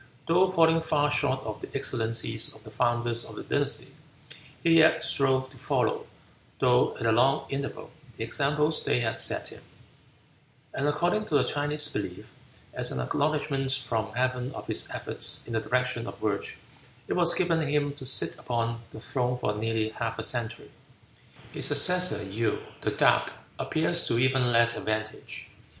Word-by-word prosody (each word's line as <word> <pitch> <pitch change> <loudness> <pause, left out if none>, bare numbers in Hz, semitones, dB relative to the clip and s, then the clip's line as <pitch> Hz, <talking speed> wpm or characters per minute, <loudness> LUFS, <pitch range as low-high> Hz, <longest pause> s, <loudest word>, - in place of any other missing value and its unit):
Though 180 +3 +4
falling 165 -2 +4
far 150 -2 +1
short 135 -3 +1
of 110 -1 -6
the - - -7
excellencies 115 -4 0
of 110 - -13
the 110 - -12
founders 120 0 0
of - - -8
the - - -7
dynasty, - - -1 0.7
he 165 -1 +5
yet 160 0 +5
strove 130 -2 +1
to 130 - -15
follow, - - 0 0.5
though 125 -1 +3
at - - -4
a 115 - +4
long 130 +6 +3
interval, 140 0 -5 0.3
the 115 - -3
examples 150 +5 0
they 125 - +1
had 115 -1 -1
set - - +1
him; - - -12 1.1
and 140 - -1
according 175 +8 +1
to 150 - +2
the 140 - +3
Chinese 145 +1 0
belief, 100 -9 -5 0.4
as - - +2
an 65 - -3
acknowledgment 140 - 0
from 115 -4 -2
Heaven 125 +1 -1
of - - -7
his - - +1
efforts - - 0
in 115 - -7
the 110 - 0
direction 125 -1 -1
of - - -8
virtue, 105 -2 -2 0.5
it - - -1
was 175 -1 +4
given 170 -3 +2
him 145 -1 0
to 145 - -11
sit 130 - +2
upon 115 -1 -2
the - - -10
throne 125 +1 -1
for 110 -4 -1
nearly 110 +1 -1
half 115 +1 -4
a 115 - -2
century. 120 0 -2 0.8
His - - -1
successor, 180 - +3
Yew, 110 +3 -1 0.2
"the - - 0
Dark," - - +2 0.3
appears 170 +2 0
to 115 - +1
even 130 0 +2
less 115 0 +4
advantage. 110 0 -4
130 Hz, 165 wpm, -27 LUFS, 115-150 Hz, 1.1 s, he